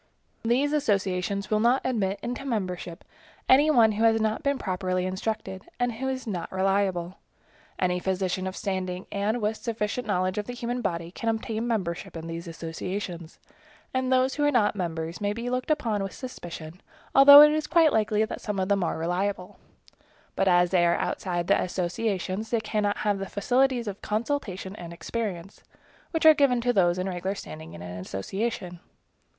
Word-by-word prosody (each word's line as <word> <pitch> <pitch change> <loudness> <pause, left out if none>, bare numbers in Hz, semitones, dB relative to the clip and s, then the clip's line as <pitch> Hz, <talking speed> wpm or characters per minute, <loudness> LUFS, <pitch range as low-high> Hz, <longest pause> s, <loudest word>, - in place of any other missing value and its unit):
These 260 +6 +1
associations 200 -7 0
will 215 - +3
not 240 +4 +3
admit 205 -6 0
into 245 +3 -4
membership 185 -9 -4 0.4
any 285 +4 +6
one 235 -7 +5
who 215 +2 -1
has 225 0 +4
not 220 0 0
been 280 -1 0
properly 185 -3 -2
instructed, 190 0 -4
and 245 0 +1
who 245 +4 -4
is 260 -1 -4
not 180 -7 -4
reliable. 190 -2 0 0.6
Any 180 -1 +1
physician 185 0 -1
of 185 - -5
standing, 185 -3 -3
and 210 +4 0
with 215 0 -1
a - - -23
sufficient 225 +1 -2
knowledge 185 0 0
of 210 - -4
the 245 - -5
human 245 +1 -3
body, 170 -5 -3
can 230 +4 -3
obtain 225 +1 -2
membership 180 -8 -3
in 165 - -7
these 165 +1 -6
associations, 170 +1 -6 0.6
and 260 0 0
those 260 +1 +3
who 295 - -1
are 290 - +4
not 230 -7 +2
members 165 -2 -4
may 205 0 0
be 235 +3 -4
looked 255 +2 -2
upon 235 -10 0
with 195 -1 -4
suspicion, 175 -8 -8 0.3
although 285 +1 +11
it 300 0 +8
is 305 0 -1
quite 325 -2 +4
likely 215 0 +2
that - - -7
some 210 -2 -3
of 190 +1 -1
them 200 -2 +2
are - - -1
reliable; 180 +3 -2 0.8
but 195 - +1
as 175 -1 +4
they 180 -2 +4
are 170 0 +3
outside 175 -2 -2
of - - -6
the - - +3
associations, 190 +3 -2
they 230 - +1
cannot 210 -1 -1
have 205 -2 0
the 195 -1 -5
facilities 245 +3 +1
of 200 -1 -5
consultation 210 -4 -3
and 170 -1 -8
experience, 195 -1 -5 0.5
which 325 -1 -1
are 315 - +10
given 275 -5 +3
to 245 +1 +1
those 175 -4 +3
in 185 +1 -2
regular 185 +1 -3
standing 80 - -9
in 85 - -9
an 90 +1 -7
association. 180 - -4
200 Hz, 185 wpm, -26 LUFS, 180-235 Hz, 0.8 s, although